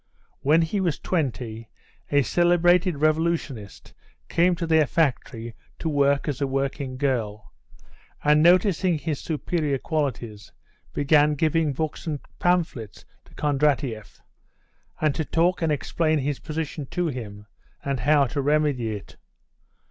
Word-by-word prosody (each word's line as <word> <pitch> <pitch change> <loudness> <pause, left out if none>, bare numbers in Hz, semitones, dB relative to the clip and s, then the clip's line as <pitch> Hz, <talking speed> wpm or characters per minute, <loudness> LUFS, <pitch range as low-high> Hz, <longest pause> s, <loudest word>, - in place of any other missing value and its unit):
When 155 +4 +3
he 180 +6 -1
was 170 -6 0
twenty 120 - -3 0.4
a 145 -1 +4
celebrated 175 +1 +3
revolutionist 155 - -1 0.4
came 175 +1 +3
to 170 0 -3
their 160 -2 +3
factory 125 -7 -1 0.2
to - - -4
work 140 -1 +2
as 145 -2 -3
a 140 - +1
working 135 -1 -2
girl, 115 -6 -2 0.7
and 150 +1 +5
noticing 180 0 +4
his 150 0 -3
superior 155 -2 -1
qualities 125 -9 -3 0.4
began 150 +1 +3
giving 155 0 +1
books 155 +4 -4
and 150 -3 -2 0.2
pamphlets 165 - -1 0.2
to - - -20
Kondratieff 140 -7 -1 0.8
and 155 -2 +2
to 160 - -2
talk 170 +4 +1
and 165 -2 +1
explain 155 +2 0
his 145 0 -2
position 155 -2 -5
to 175 +5 -2
him, 110 -9 -5 0.4
and 140 -2 -1
how 145 +3 +4
to 140 +3 -2
remedy 140 -6 +1
it. 100 - -11
150 Hz, 130 wpm, -24 LUFS, 135-165 Hz, 0.8 s, and